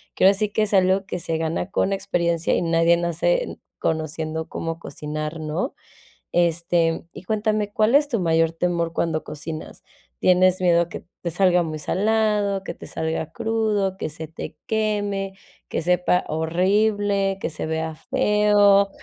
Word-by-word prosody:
Que - - +3
ahora 195 - +8
sí, 210 +1 -1
que 215 +1 +1
es 210 0 -2
algo 190 +1 +3
que 180 - -4
se 165 -1 -2
gana 165 +3 -2
con 195 -1 +1
experiencia, 170 -3 0
y - - +1
nadie 165 0 +3
nace 175 - 0 0.2
conociendo 160 0 -2
cómo 165 0 -4
cocinar, 155 +1 -5
¿no? 155 - -2 0.6
Este, 170 -1 +1
y - - -10
cuéntame, 215 0 -1
¿cuál 220 +5 +3
es 295 0 +5
tu 230 - 0
mayor 165 -1 +2
temor 170 -1 -1
cuando 160 -2 -1
cocinas? 155 +1 -7 0.4
¿Tienes 185 +1 +4
miedo 170 -1 +3
que - - -8 0.2
te 170 - -3
salga 180 0 +3
muy 155 -2 -5
salado, 210 +1 +1
que - - -5
te - - -11
salga 160 -1 -3
crudo, 220 -4 0
que 160 - -3
se 160 +1 -7
te 160 - -7
queme, 205 -3 -1 0.4
que - - -2
sepa 180 +1 +2
horrible, 195 +4 +1
que - - -1
se 160 - -5
vea 160 0 -2
feo? 205 +1 +3
180 Hz, 160 wpm, -23 LUFS, 165-205 Hz, 0.6 s, ahora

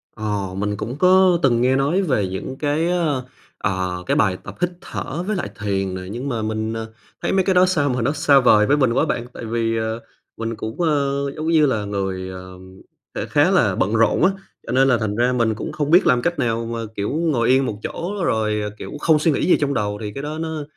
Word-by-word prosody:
Ờ, 105 -3 -3
mình 105 +1 -2
cũng 115 +5 -4
có 185 0 +5
từng 120 -3 +3
nghe 130 +1 +3
nói 145 +8 +1
về 130 - 0
những 95 +8 -5
cái, 155 +3 0
ơ, 155 -8 0 0.3
ờ, 90 -2 -2
cái - - +1
bài 95 -4 +2
tập - - -9
hít 175 - +2
thở 165 +6 -5
với 215 - 0
lại 180 - -3
thiền 95 -2 -2
nè. 95 - -5
Nhưng 125 +5 -4
mà 115 -4 -2
mình, 110 +1 -2
ờ, 110 0 -5 0.3
thấy - - -1
mấy 190 -1 +2
cái 190 0 +1
đó 180 +1 +6
sao 160 -6 +1
mà 125 -1 -1
nó 130 +5 +1
xa 145 -2 +4
vời 110 -4 +5
với 145 +6 +3
mình 130 -5 +2
quá - - +2
bạn. 120 0 -2
Tại 115 - -7
vì, 115 0 -1
ờ, 110 +1 -2 0.4
mình 115 0 -3
cũng, 110 +10 -5
ơ, 140 -3 +1
giống 155 +1 -4
như 160 -2 +4
là 110 -7 0
người, 95 -2 -3
ờ, 95 0 -9 0.6
sẽ - - -2
khá - - +3
là - - +3
bận 100 +3 0
rộn 115 +7 +3
á, 190 - +5 0.4
cho - - -3
nên 135 +2 +4
là 125 -3 +4
thành 110 -2 -2
ra 120 +3 +2
mình 115 -3 +1
cũng - - -5
không 150 -1 -2
biết 180 +3 +6
làm 125 -1 +4
cách 175 +1 -1
nào 115 -2 0
mà, 115 0 -4 0.2
kiểu, 100 +1 -2
ngồi 150 -7 0
yên 130 +1 +4
một 105 -4 -4
chỗ 175 +4 -4
rồi, 110 -4 0 0.2
kiểu, - - -8
không 155 -1 +3
suy 160 +1 +2
nghĩ - - 0
gì - - +6
trong 140 -1 0
đầu, 105 -3 -1
thì 105 -1 -4
cái 140 - -6
đó 155 +1 -4
nó, 160 -2 -4
120 Hz, 245 wpm, -21 LUFS, 110-150 Hz, 0.6 s, đó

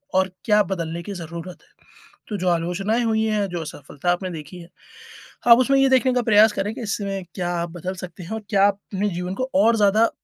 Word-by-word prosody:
और 190 0 +2
क्या 210 -2 +4
बदलने 170 -3 -4
की 200 - -6
ज़रूरत 170 0 -7
है? - - -27 0.6
तो 210 - -3
जो 185 - -2
आलोचनाएँ 180 +7 0
हुई 220 -1 +1
हैं, 210 -2 0
जो 175 -1 -4
असफलता 150 +2 -4
आपने 185 +1 -2
देखी 165 +2 -8
है, 170 - -14 0.8
आप 235 -1 +9
उसमें 275 +2 +3
ये 270 0 +4
देखने 260 0 +3
का 250 - +2
प्रयास 215 0 +6
करें 205 +2 -2
कि - - -7
इसमें 200 -3 -3
क्या 175 -2 -2
आप 170 - -3
बदल 180 +2 -5
सकते 180 0 -12
हैं, 170 - -10
और 220 -1 -4
क्या 200 -2 +4
आप 200 0 -1
अपने 200 +2 0
जीवन 180 0 -4
को 255 - -2
और 225 +4 +4
ज़्यादा 215 +2 +4
195 Hz, 225 wpm, -22 LUFS, 175-220 Hz, 0.8 s, आप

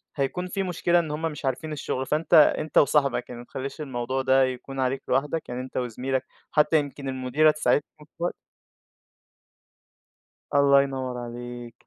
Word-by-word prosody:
هيكون 155 +6 -2
في 195 +1 -2
مشكلة 175 -1 +2
إن 160 -3 -3
هم 150 +2 -4
مش 150 - -8
عارفين 135 +4 -2
الشغل، 135 -3 -3
فأنت 155 +3 -1
أنت 155 0 +5
وصاحبك، 140 -3 +3
يعني 120 -1 -7
ما - - -12
تخلّيش 135 +4 -6
الموضوع 130 -1 -2
ده 130 0 +4
يكون 130 +1 -4
عليك 130 +1 0
لوحدك، 145 +3 0
يعني 125 +1 -3
أنت 130 - -7
وزميلك، 125 +2 -2 0.3
حتّى 150 +1 +4
يمكن 140 -1 -5
المديرة 130 +4 +3
تساعدكم 150 0 -1
شوية 175 +1 -1 2.2
الله 140 -1 +6
ينوَّر 130 -2 -3
عليك. 120 0 -8
135 Hz, 150 wpm, -26 LUFS, 130-150 Hz, 2.2 s, الله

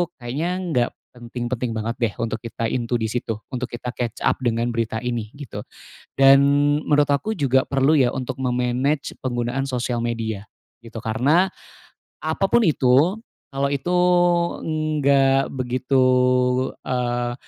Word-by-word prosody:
kayaknya 135 +8 -3 0.2
nggak 120 -5 +1 0.3
penting-penting 120 0 -4
banget 110 +2 -3
deh 115 -4 0
untuk 110 -1 -2
kita 115 0 -4
into 120 -1 -2
di 110 -2 0
situ, 115 -1 -2 0.2
untuk 130 -1 -3
kita 120 +1 -5
catch 120 -1 -4
up - - +2
dengan 120 -1 -1
berita 115 -1 -2
ini 120 -3 -4
gitu. 145 -5 -8 0.5
Dan 135 0 +7 0.4
menurut 145 -1 +3
aku 180 +10 -1
juga 135 -2 +3
perlu 135 +2 +2
ya 130 -5 +4
untuk 130 -2 -4
me-manage 125 +3 0
penggunaan 120 +1 -2
sosial 125 -3 -2
media 115 -3 -3 0.4
gitu, 115 0 -9
karena, 135 +11 +2 0.8
apa 160 +5 0
pun 235 +4 +3
itu 150 - +3 0.3
kalau 140 0 -1
itu 140 +5 -3 1.1
nggak 135 -1 +3
begitu, 130 +1 +1 0.8
eee, 120 -1 -1
125 Hz, 135 wpm, -22 LUFS, 120-135 Hz, 1.1 s, Dan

